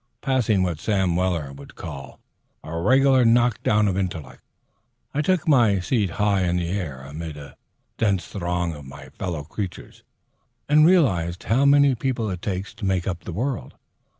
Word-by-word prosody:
Passing 120 -8 +1
what 85 -4 -2
Sam 95 -3 0
Weller 85 -6 -1
would 70 0 -13
call 70 -4 -9 0.4
"a 80 - -7
reg'lar 130 +8 +4
knock 120 0 +3
down 105 0 +2
of 95 - 0
intellect," 90 -7 -4 0.7
I 150 - 0
took 180 0 0
my 120 -9 +4
seat 100 +1 0
high 105 -2 +2
in 90 -1 +1
the 85 -1 -2
air 80 -10 -4
amid 75 +2 -7
a 70 -3 -11 0.4
dense 100 -4 +1
throng 90 -2 -2
of 75 -2 -10
my 70 0 -11
fellow 85 -2 -5
creatures, 90 +4 -7 0.7
and 155 +2 +6
realized 95 - +2
how 130 +5 +2
many 140 -1 +5
people 120 -3 -2
it 90 -2 -5
takes 95 0 -4
to 115 -1 -13
make 95 -2 0
up 90 -2 -4
the - - -5
world. 120 +8 -3
95 Hz, 170 wpm, -23 LUFS, 85-120 Hz, 0.7 s, and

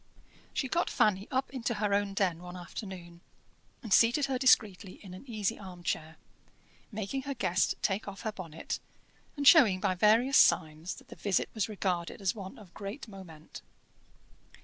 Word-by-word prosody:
She 265 - -2
got 340 +6 0
Fanny 200 -1 +2
up 260 +1 -1
into 240 -3 -2
her 205 -1 0
own 200 -1 0
den 180 -4 0
one 180 0 -8
afternoon, 175 -1 -8 0.6
and 220 -5 -1
seated 240 +5 +5
her 265 -2 -2
discreetly 210 -7 +3
in 190 -3 -12
an 190 +8 -12
easy 215 -4 -2
arm 185 -3 -10
chair, 160 -1 -3 0.7
making 220 +5 -3
her 275 +1 -5
guest 185 -6 +1
take 200 +2 0
off 195 -1 -7
her 220 - -2
bonnet, 165 -6 -6 0.6
and 285 -1 +1
showing 250 - +7
by 190 -1 +1
various 225 +8 +4
signs 155 +3 +3
that - - -16
the - - -10
visit 200 -2 0
was 220 -1 -1
regarded 185 -5 -2
as 195 0 0
one 195 -4 -9
of 195 -5 -15
great 205 +6 -7
moment. 180 -7 -11
200 Hz, 170 wpm, -30 LUFS, 180-230 Hz, 0.7 s, showing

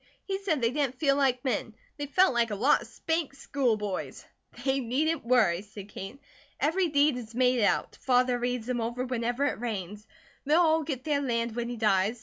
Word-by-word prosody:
He 385 -1 -3
said 330 -9 -1
they 230 0 +2
didn't 270 -2 -1
feel 275 -2 +2
like 265 -2 +1
men, 225 -3 -2 0.2
they 290 -1 -4
felt 365 +1 +4
like 235 -1 +2
a 210 - -2
lot 250 +9 +3
of - - -10
'spanked 320 -4 -2
school 270 -5 0
boys.'" 205 -3 -5 0.4
"They 270 0 +2
needn't 285 +7 0
worry," 225 -8 +3
said 205 -1 -11
Kate. 195 +5 -8 0.4
"Every 350 +4 +2
deed 290 -3 +3
is 230 -2 -9
made 250 -1 +3
out. - - +1
Father 250 -1 +2
reads 245 -1 -2
them 245 -1 -2
over 240 +3 -2
whenever 245 +2 -1
it 285 - -1
rains. 210 -2 -5 0.4
They'll 300 +3 +3
all 320 -2 +4
get 275 -4 -4
their 290 -2 0
land 235 -3 -1
when 240 0 -2
he 245 - -5
dies. 210 +1 +2
250 Hz, 200 wpm, -28 LUFS, 230-285 Hz, 0.4 s, felt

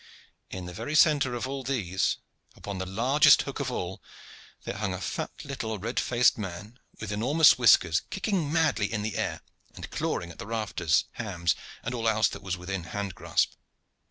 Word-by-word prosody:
In 95 -1 -6
the 90 - -7
very 145 - -4
centre 145 -5 +4
of 120 +2 -3
all 135 0 -4
these, 105 -9 0 0.4
upon 100 -2 -6
the 95 - -3
largest 125 +10 +5
hook - - -6
of - - -1
all, - - -4 0.6
there - - -5
hung 100 -2 -2
a - - -6
fat - - -3 0.2
little 115 -6 -4
red 115 +5 -2
faced 120 -1 +3
man 105 +5 -7 0.2
with 110 -2 -5
enormous 135 +8 +5
whiskers, 95 -8 +5
kicking 190 -5 -1
madly 155 -10 +1
in 105 -2 -2
the 110 -2 -3
air - - -2 0.3
and - - -8
clawing 85 - -2
at - - -10
rafters, 105 -7 0
hams, 90 -8 -1 0.3
and 125 - -3
all 115 -2 +1
else 110 0 +3
that 100 - -8
was 95 -1 -3
within 90 0 -5
hand 100 +2 -4
grasp. - - 0
110 Hz, 180 wpm, -28 LUFS, 95-130 Hz, 0.6 s, largest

